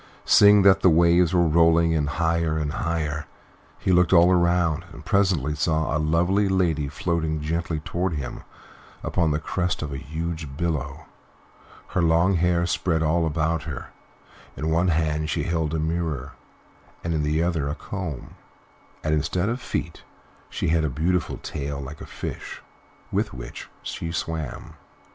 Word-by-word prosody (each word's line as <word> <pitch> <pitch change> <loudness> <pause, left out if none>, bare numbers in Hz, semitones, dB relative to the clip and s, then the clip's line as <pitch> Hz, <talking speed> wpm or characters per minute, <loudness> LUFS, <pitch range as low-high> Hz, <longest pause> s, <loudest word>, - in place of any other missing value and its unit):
Seeing 100 -1 +7
that 95 -1 +6
the 95 - +6
waves 85 +1 +4
were 90 -2 +3
rolling 85 +1 +4
in 75 -3 +1
higher 80 +1 0
than 75 -2 -1
ever, 75 -3 -2 0.5
he - - -1
looked 90 -2 +4
all 90 +1 +6
round, 85 -2 +2
and - - -12
presently 90 -8 +2
saw 80 0 0
a - - +1
lovely 90 +6 +2
lady 85 -6 +1
floating 80 +1 -1
gently 80 +1 -2
toward 90 +3 -2
him 70 -5 -5 0.6
upon 80 -2 +1
the 75 - +1
crest 90 +2 -2
of 70 -2 -5
a - - -4
huge 80 +1 -5
billow, 85 -5 -3 0.8
her 95 - 0
long 85 +3 +3
hair 85 0 +2
spread 80 -1 0
all 80 +1 +2
about 80 +1 0
her; 70 -4 -7 0.7
in 80 +1 -1
one 85 +3 +2
hand 80 -2 0
she - - -1
held 80 -3 -1
a 80 - -1
mirror, 80 -4 -2 0.7
and 85 - -1
in 80 - 0
the 75 +2 +1
other 80 -5 0
a 70 - -3
comb, 85 -7 -6 0.7
and 75 - 0
instead 90 +6 0
of 120 +2 -3
feet - - -4 0.5
she - - -2
had 80 0 +2
a 75 - 0
beautiful 85 +7 -1
tail 70 0 -5
like 70 +2 -8
a - - -8
fish, - - -7 0.5
with - - -1
which - - -8
she 85 - -4
swam. 80 -3 -4
80 Hz, 160 wpm, -24 LUFS, 75-85 Hz, 0.8 s, Seeing